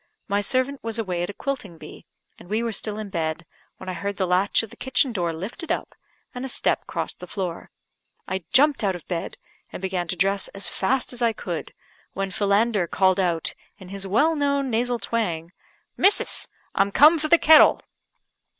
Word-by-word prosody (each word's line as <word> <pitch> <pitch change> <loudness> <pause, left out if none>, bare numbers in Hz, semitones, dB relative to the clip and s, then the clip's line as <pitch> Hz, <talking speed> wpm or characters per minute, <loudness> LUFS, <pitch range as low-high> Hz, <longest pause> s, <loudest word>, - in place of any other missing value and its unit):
My 200 -1 +1
servant 260 +5 -1
was 225 -1 -2
away 185 -6 -2
at 175 - -2
a - - -5
quilting 250 -9 -5
bee, - - -12 0.3
and 175 - -15
we 220 +3 0
were 230 - -1
still 210 0 -1
in 215 -2 -6
bed, 165 -1 -3 0.3
when 185 - -11
I 185 - -3
heard 200 +2 -4
the 190 - +1
latch 185 +5 +2
of 225 - -9
the - - -12
kitchen 265 0 +1
door 175 -6 -1
lifted 200 - -6
up, - - -3 0.4
and 250 - -6
a - - -3
step - - +1
crossed - - -4
the - - -9
floor. 180 -4 -5 0.6
I 190 -1 -3
jumped 285 -2 +4
out 195 -2 +1
of 175 - -11
bed, 170 -2 -4 0.3
and - - -7
began 185 -2 -2
to 175 - -2
dress 195 +2 +1
as 195 - -1
fast 250 +6 0
as 245 - -5
I 230 -1 +3
could, 175 -6 -5 0.4
when 195 0 -3
Philander 200 0 +1
called 190 +2 +2
out, 170 -4 0 0.2
in 185 - -12
his 195 0 -5
well 295 +12 +3
known 280 -2 0
nasal 240 +2 0
twang 175 -9 -3 0.5
"Missus! 400 - +3 0.3
I'm 200 +1 +2
come 310 +8 +6
for 310 - -1
the 340 - +6
kettle." 315 -1 +7
200 Hz, 195 wpm, -24 LUFS, 185-245 Hz, 0.6 s, kettle